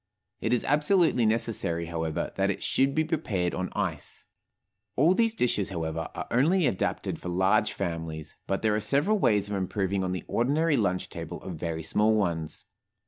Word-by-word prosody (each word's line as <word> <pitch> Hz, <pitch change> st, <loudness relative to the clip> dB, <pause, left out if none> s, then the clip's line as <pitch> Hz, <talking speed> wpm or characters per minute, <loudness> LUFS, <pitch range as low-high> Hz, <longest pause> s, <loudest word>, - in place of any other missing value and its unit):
It -, -, -1 dB
is 125 Hz, -, +2 dB
absolutely 150 Hz, -, +3 dB
necessary, 110 Hz, -7 st, -1 dB
however, 80 Hz, -1 st, -3 dB
that -, -, +1 dB
it -, -, -2 dB
should 135 Hz, +1 st, +1 dB
be 160 Hz, -, +3 dB
prepared 105 Hz, -, -1 dB
on 95 Hz, 0 st, -2 dB
ice. -, -, -3 dB, 0.7 s
All 160 Hz, +7 st, +5 dB
these 225 Hz, +2 st, +2 dB
dishes, 105 Hz, -, +1 dB
however, 80 Hz, -3 st, -3 dB
are -, -, -4 dB
only 160 Hz, +8 st, +3 dB
adapted 115 Hz, -8 st, -1 dB
for 90 Hz, -, -5 dB
large 95 Hz, +2 st, +2 dB
families, 80 Hz, -2 st, -4 dB
but 95 Hz, +2 st, -1 dB
there 110 Hz, -1 st, +3 dB
are -, -, +1 dB
several 145 Hz, -, +2 dB
ways 105 Hz, -, +3 dB
of 100 Hz, -, -3 dB
improving 95 Hz, 0 st, -1 dB
on 90 Hz, -, -1 dB
the 90 Hz, -, -3 dB
ordinary 150 Hz, +6 st, +2 dB
lunch 95 Hz, -7 st, 0 dB
table 85 Hz, +1 st, -6 dB
of 95 Hz, -, -5 dB
very 80 Hz, -1 st, -3 dB
small 110 Hz, +5 st, +3 dB
ones. 85 Hz, -7 st, -2 dB
100 Hz, 175 wpm, -28 LUFS, 85-135 Hz, 0.7 s, All